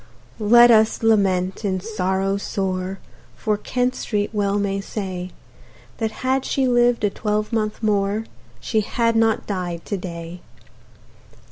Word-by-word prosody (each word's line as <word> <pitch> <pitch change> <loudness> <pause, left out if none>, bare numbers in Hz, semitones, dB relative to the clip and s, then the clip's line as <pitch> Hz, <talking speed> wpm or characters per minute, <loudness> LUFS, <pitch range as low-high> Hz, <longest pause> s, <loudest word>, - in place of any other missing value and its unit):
Let 240 +3 +7
us 220 0 +3
lament, 190 -3 +2
in 190 -2 0
sorrow 195 -1 -1
sore, 190 -1 -3 0.4
For 215 -1 0
Kent 250 +4 -1
Street 205 -4 -2
well 205 -1 +1
may 200 -1 -1
say, 185 -3 -5 0.7
That 225 -1 0 0.2
had 260 0 +2
she 270 -1 0
lived 240 -1 +3
a 205 - +2
twelvemonth 215 +1 -2
more 205 +1 +1 0.3
She 215 - 0
had 230 +2 0
not 225 -1 +2
died 180 -4 -4
to 200 - -2
day. 170 -1 -7
205 Hz, 130 wpm, -22 LUFS, 190-225 Hz, 0.7 s, Let